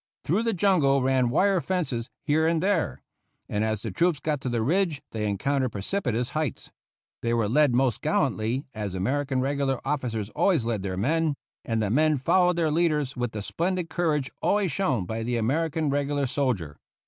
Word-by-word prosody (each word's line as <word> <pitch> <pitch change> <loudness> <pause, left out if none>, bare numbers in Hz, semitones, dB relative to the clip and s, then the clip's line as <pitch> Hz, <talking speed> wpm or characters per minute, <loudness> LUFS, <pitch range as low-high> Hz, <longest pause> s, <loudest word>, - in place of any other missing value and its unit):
Through 185 +9 +1
the 230 -1 0
jungle 160 -8 +3
ran 130 -2 +2
wire 190 +7 +3
fences 140 -8 -2
here 160 +1 +2
and 165 0 +1
there, 195 -4 0 0.4
and 105 +1 -1
as 110 -2 -1
the 110 - -3
troops 170 - +1
got 150 -2 -2
to 130 - -2
the 120 -2 0
ridge 165 - +1
they 105 -2 -2
encountered 130 +4 0
precipitous 125 - -2
heights. 155 -5 -3 0.5
They 115 0 0
were 115 -3 +1
led 140 +2 +3
most 125 -3 +1
gallantly, 130 -4 0
as 105 -4 -4
American 130 +7 0
regular 135 -1 0
officers 115 -7 -2
always 165 - +2
lead 115 -4 -1
their 95 -1 -3
men; 155 - +1 0.3
and 115 -1 -1
the 100 - -1
men 155 +4 +3
followed 180 +7 +3
their 165 -3 +1
leaders 150 -4 +1
with 125 -2 -2
the 105 -2 -5
splendid 175 - -2
courage 150 -6 0
always 200 -4 +2
shown 135 - 0
by 110 +5 -4
the 120 +1 -1
American 155 +6 0
regular 145 0 0
soldier. 120 - -1
140 Hz, 180 wpm, -26 LUFS, 115-160 Hz, 0.5 s, jungle